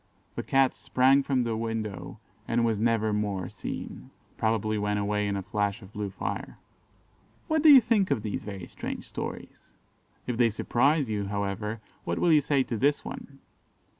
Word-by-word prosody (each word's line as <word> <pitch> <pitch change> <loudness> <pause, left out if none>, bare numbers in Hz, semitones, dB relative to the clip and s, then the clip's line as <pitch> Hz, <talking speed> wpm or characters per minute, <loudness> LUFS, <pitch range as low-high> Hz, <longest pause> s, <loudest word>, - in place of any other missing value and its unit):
"The - - -3
Cat 135 -1 +3
sprang 130 +2 +3
from 135 -2 +1
the 115 -1 -1
window, 110 -3 -4 0.3
and 115 0 +2
was 110 -3 +1
never 110 -1 +2
more 100 -3 -2
seen." 65 - -7 0.3
(Probably 110 -1 0
went 105 0 0
away 105 0 0
in 100 - -1
a 95 - -4
flash 105 +2 -2
of 95 +2 -14
blue 105 -2 -3
fire.) 95 - -5 0.9
What 315 -1 +2
do 310 - +7
you 280 -3 +11
think 220 -4 +2
of 105 - 0
these 105 -3 -3
very 100 -3 -6
strange - - -6
stories? - - -7 0.5
If 125 -2 -2
they 120 -1 +4
surprise 135 +6 +2
you, 105 -2 -2
however, 100 +2 -3 0.2
what 85 - -2
will 175 - +3
you 150 - +6
say 140 -1 +2
to 115 - -4
this 140 +5 +1
one? 135 -1 -9
110 Hz, 175 wpm, -28 LUFS, 105-130 Hz, 0.9 s, you